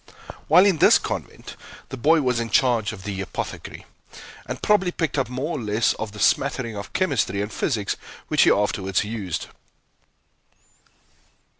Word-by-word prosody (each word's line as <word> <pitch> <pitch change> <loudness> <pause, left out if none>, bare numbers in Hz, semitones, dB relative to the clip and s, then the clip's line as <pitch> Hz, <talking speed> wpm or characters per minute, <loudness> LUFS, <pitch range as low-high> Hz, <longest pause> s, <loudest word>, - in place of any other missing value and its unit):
While 180 +5 +6
in 190 -6 +2
this - - +7
convent, - - -6 0.3
the - - -5
boy 155 +6 +3
was 125 -3 0
in 115 -1 -3
charge 115 -2 +2
of 100 -4 -10
the 100 -1 -4
apothecary, 95 - -6 0.6
and - - -5
probably 200 -4 +2
picked 165 -4 -2
up 135 -4 0
more 140 +5 -3
or - - -6
less 105 +1 +1
of 110 -2 -6
the 105 - -12
smattering 125 -4 +1
of 100 -1 -8
chemistry 140 - 0
and 105 +2 -3
physics 105 -7 -1 0.3
which - - +2
he - - +6
afterwards 95 -2 0
used. 105 -5 -4
115 Hz, 155 wpm, -23 LUFS, 105-145 Hz, 0.6 s, this